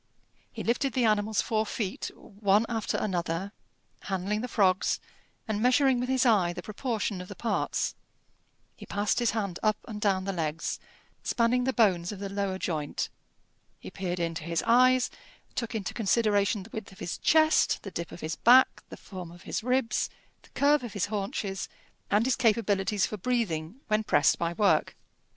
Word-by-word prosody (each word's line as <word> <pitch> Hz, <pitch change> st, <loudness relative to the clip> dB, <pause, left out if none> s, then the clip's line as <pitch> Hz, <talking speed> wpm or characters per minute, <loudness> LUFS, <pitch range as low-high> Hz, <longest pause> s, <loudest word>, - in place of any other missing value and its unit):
He -, -, -6 dB
lifted 255 Hz, +4 st, 0 dB
the 255 Hz, -3 st, +2 dB
animal's 215 Hz, -1 st, +2 dB
four 220 Hz, -1 st, +1 dB
feet, 205 Hz, -2 st, -3 dB
one 205 Hz, +1 st, +1 dB
after 225 Hz, -2 st, -2 dB
another, 180 Hz, -1 st, -2 dB, 0.5 s
handling 195 Hz, +2 st, -1 dB
the 250 Hz, -, -3 dB
frogs, 190 Hz, -5 st, +2 dB, 0.5 s
and 215 Hz, -1 st, -1 dB
measuring 255 Hz, +1 st, +4 dB
with 250 Hz, +1 st, -2 dB
his 260 Hz, 0 st, +2 dB
eye 195 Hz, -7 st, +4 dB
the 175 Hz, -, -7 dB
proportion 215 Hz, -3 st, -3 dB
of 180 Hz, -, -9 dB
the -, -, -9 dB
parts; 235 Hz, -, -1 dB, 0.8 s
he -, -, -12 dB
passed 205 Hz, +2 st, 0 dB
his 240 Hz, -2 st, +2 dB
hand 200 Hz, -6 st, -2 dB
up 215 Hz, -1 st, +2 dB
and 210 Hz, -3 st, -6 dB
down 195 Hz, -3 st, +2 dB
the 195 Hz, 0 st, -2 dB
legs, 165 Hz, -2 st, -2 dB, 0.4 s
spanning 245 Hz, +1 st, +1 dB
the 265 Hz, -, +2 dB
bones 190 Hz, -8 st, +2 dB
of 205 Hz, -, -6 dB
the 200 Hz, 0 st, -5 dB
lower 195 Hz, -1 st, -2 dB
joint; 155 Hz, -6 st, -2 dB, 0.7 s
he -, -, -10 dB
peered 180 Hz, -2 st, -3 dB
into 165 Hz, -1 st, -2 dB
his 170 Hz, 0 st, -1 dB
eyes, 250 Hz, +2 st, +4 dB, 0.4 s
took 230 Hz, -2 st, -3 dB
into 200 Hz, -4 st, -3 dB
consideration 210 Hz, -2 st, +2 dB
the 220 Hz, -, -15 dB
width 215 Hz, -2 st, -6 dB
of 190 Hz, -, -15 dB
his 175 Hz, -, -5 dB
chest, 315 Hz, 0 st, +3 dB
the 195 Hz, -, -7 dB
dip 170 Hz, -1 st, -5 dB
of -, -, -10 dB
his 155 Hz, 0 st, -3 dB
back, 255 Hz, +3 st, +5 dB
the -, -, -9 dB
form 185 Hz, -3 st, -9 dB
of 175 Hz, 0 st, -14 dB
his -, -, -3 dB
ribs, 250 Hz, -2 st, +1 dB, 0.3 s
the -, -, -21 dB
curve 285 Hz, -1 st, +4 dB
of 235 Hz, -5 st, -6 dB
his 205 Hz, -, 0 dB
haunches, 195 Hz, -1 st, -3 dB, 0.4 s
and 210 Hz, +3 st, +3 dB
his 260 Hz, -, +2 dB
capabilities 210 Hz, -4 st, +2 dB
for 215 Hz, -, -5 dB
breathing 205 Hz, -2 st, -2 dB
when 215 Hz, 0 st, +1 dB
pressed -, -, +3 dB
by 170 Hz, 0 st, 0 dB
work. 205 Hz, +3 st, +2 dB
210 Hz, 175 wpm, -28 LUFS, 190-235 Hz, 0.8 s, back